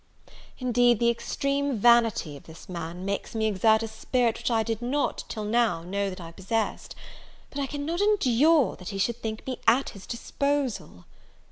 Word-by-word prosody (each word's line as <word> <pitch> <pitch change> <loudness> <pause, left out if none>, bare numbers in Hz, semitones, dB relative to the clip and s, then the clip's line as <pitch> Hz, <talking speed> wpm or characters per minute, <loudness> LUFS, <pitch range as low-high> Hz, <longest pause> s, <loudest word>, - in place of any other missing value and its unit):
Indeed, 245 -2 +3
the 235 0 +4
extreme 275 +2 -1
vanity 230 -8 +4
of 140 - -13
this 160 0 -13
man, 175 0 -6
makes 200 +3 -3
me 220 0 +1
exert 220 +2 +3
a - - -2
spirit 230 +1 0
which - - -1
I 225 -2 +2
did 225 0 -3
not, 270 +4 -1
till 215 - -4
now, 210 -6 +1
know 200 +3 -2
that 185 - -8
I 165 -1 -8
possessed: 205 +6 -3 0.6
but 285 - -5
I 275 - -1
cannot 295 +6 -3
endure 315 - +3
that 180 - -8
he 195 - -5
should 235 +4 -1
think 220 -1 -5
me 260 -1 -4
at 265 +3 +4
his 195 -2 -12
disposal. 245 - -2
230 Hz, 175 wpm, -27 LUFS, 195-255 Hz, 0.6 s, the